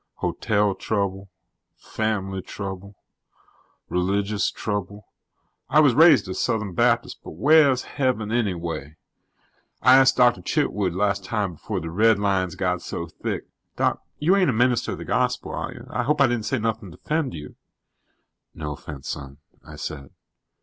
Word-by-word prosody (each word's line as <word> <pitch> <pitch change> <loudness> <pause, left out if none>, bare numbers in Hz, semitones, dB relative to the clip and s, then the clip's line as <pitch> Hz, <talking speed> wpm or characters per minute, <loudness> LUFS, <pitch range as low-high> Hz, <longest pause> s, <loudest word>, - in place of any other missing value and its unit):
Hotel 105 -1 0
trouble. 100 -1 -2 0.5
Fam'ly 95 -3 -3
trouble. 100 +1 -7 0.9
Religious 100 +3 0
trouble. 105 -1 -4 0.6
I 150 - +5
was 145 -5 +5
raised 155 - +6
a 95 - -4
Southern 110 -3 -1
Baptist, - - +1
but - - -9
wheah's 140 - +5
Heaven, 125 -6 -1
anyway? 85 - -2 0.9
I 130 +1 +8
ask' 135 0 +5
Doctor 120 -1 +4
Chitwood 105 - 0
las' 100 +1 +1
time 100 +1 -2
home - - -10
before 80 - -4
the 80 - -5
redlines 100 -3 +2
got - - -1
so 85 - -5
thick 85 - -5 0.3
Doc, - - 0 0.2
you 165 +6 +3
aren't 195 -4 +3
a - - +1
minister 120 +1 +1
of - - -6
the - - -8
Gospel, - - -1
are - - -4
you? - - -11
I - - -1
hope 150 +5 0
I 140 - +7
di'n' 120 -2 0
say 120 +5 -1
anything 110 -3 -2
to 80 - -13
offend 155 - -2
you." 75 -1 -9 1.0
"No 75 -2 -4
offense, 70 -1 -9
son," 70 -1 -6 0.3
I - - -11
said. 70 -3 -6
105 Hz, 155 wpm, -24 LUFS, 95-125 Hz, 1.0 s, I